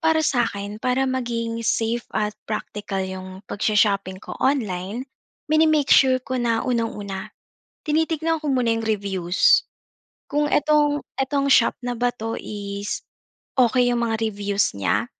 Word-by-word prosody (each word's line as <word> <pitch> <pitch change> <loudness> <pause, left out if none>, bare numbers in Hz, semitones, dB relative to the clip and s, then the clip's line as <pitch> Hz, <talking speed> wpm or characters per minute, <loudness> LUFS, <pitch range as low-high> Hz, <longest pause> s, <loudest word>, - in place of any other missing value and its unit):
Para 320 -1 +3
sa 245 -6 +2
akin, 205 +1 -6
para 255 +3 +1
maging 230 -3 -2
safe 230 +2 0
at 210 -1 0
praktikal 205 -2 -3
'yung 185 0 -7
pag-sho-shopping 200 -3 +1
ko - - -7
online, 220 -4 -1 0.5
mini-make 310 -2 +4
sure 260 -1 +6
ko 260 0 -3
na 230 -2 +1
unang-una, 210 -6 -2 0.6
tinitignan 320 +1 +1
ko - - -2
muna 250 -2 +1
'yung 225 - -3
reviews. 195 -4 +2 0.7
Kung 295 0 +1
etong 295 0 +3 0.2
etong 275 +1 0
shop 230 - +4
na 245 - -1
ba 245 +1 +2
'to 225 -1 -4
is 200 -1 -5 0.6
okey 245 +1 +3
'yung 240 - 0
mga 225 -1 0
reviews 200 0 0
niya, 100 - +1
230 Hz, 140 wpm, -23 LUFS, 205-265 Hz, 0.7 s, sure